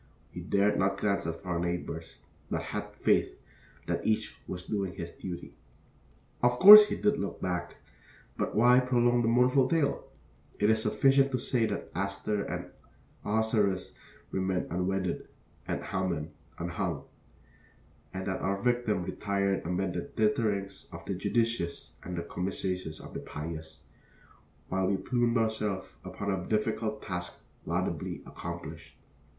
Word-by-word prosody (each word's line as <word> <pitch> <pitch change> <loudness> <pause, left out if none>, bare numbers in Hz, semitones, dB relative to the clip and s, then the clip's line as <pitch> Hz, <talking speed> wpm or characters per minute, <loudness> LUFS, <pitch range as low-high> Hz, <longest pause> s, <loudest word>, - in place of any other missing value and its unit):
We - - -6
dared 100 +1 +2
not 100 +1 +2
glance 100 -4 0
at 80 +3 -5
our 90 -2 -1
neighbors, 85 -2 -4 0.3
but - - -2
had - - -5
faith - - +2 0.5
that - - -2
each 110 -1 0
was 90 -1 -5
doing 100 -3 -2
his 85 -2 -6
duty. 90 -2 -7 0.9
Of 125 0 +3
course 210 +6 +12
he - - -2
did 210 0 +1
look - - -4
back, 90 -1 -3 0.6
but - - -2
why 125 +3 +6
prolong 120 -1 +3
the 115 - +1
mournful 125 +3 +4
tale? 160 -4 +1 0.5
It 105 +1 +4
is 110 0 +2
sufficient 135 +5 +4
to - - +3
say 115 -2 +1
that 100 - -4
Esther 100 +3 -2
and 90 -1 -5 0.5
Ahasuerus 105 -3 +1 0.4
remained 95 -1 -1
unwedded 90 0 -1 0.4
and - - -2
Haman 85 -5 -2 0.3
unhung; 85 -3 -3 1.1
and 95 0 -5
that 95 - -2
our 100 +1 0
victim 120 -5 +1
retired 100 +1 -1
amid 90 +1 -1
the - - -2
titterings 110 -6 -1
of - - -9
the - - -2
judicious 115 -8 -1
and 90 0 -6
the 85 - -2
commiserations 90 -2 -3
of - - -11
the - - -4
pious, 80 +1 -7 0.8
while 95 0 0
we 100 0 +2
plumed 120 +4 +1
ourselves 105 -4 -1
upon 95 +2 -3
a 95 -2 -3
difficult 110 0 -1
task 90 -2 -5 0.2
laudably - - -2
accomplished. - - -8
100 Hz, 140 wpm, -30 LUFS, 90-115 Hz, 1.1 s, course